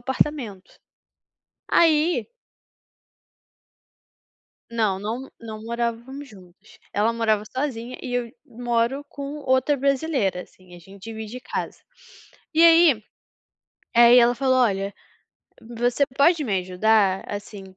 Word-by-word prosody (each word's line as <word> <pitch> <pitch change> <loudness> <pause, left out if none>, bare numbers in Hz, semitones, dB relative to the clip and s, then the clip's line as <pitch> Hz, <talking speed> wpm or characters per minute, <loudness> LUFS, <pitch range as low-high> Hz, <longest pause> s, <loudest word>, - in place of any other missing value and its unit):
apartamento. 255 -6 -2 1.0
Aí 325 +1 +3 2.5
Não, 215 -5 0
não, 230 +6 -5
não 220 -2 -8
morávamos 235 +4 -4
juntas, 190 -1 -18
ela 215 +3 +1
morava 220 -2 +1
sozinha 255 -1 -4
e 250 -2 -5
eu 245 -1 -2 0.2
moro 240 +3 -1
com 285 +1 -7
outra 260 +1 +1
brasileira, 270 - 0
assim, 180 -1 -17
a - - -12
gente 195 +3 -16
divide 220 +2 -7
casa. - - -5 0.7
E 325 - +5
aí 330 -10 +6 0.9
aí 240 +1 +8
ela 240 0 +5
falou: 260 +1 +1
"Olha, 200 -5 +1 0.7
você 240 +4 0
pode 310 +3 +4
me 200 -7 0
ajudar 190 +1 +2
assim, 205 -1 -7
235 Hz, 110 wpm, -23 LUFS, 210-270 Hz, 2.5 s, aí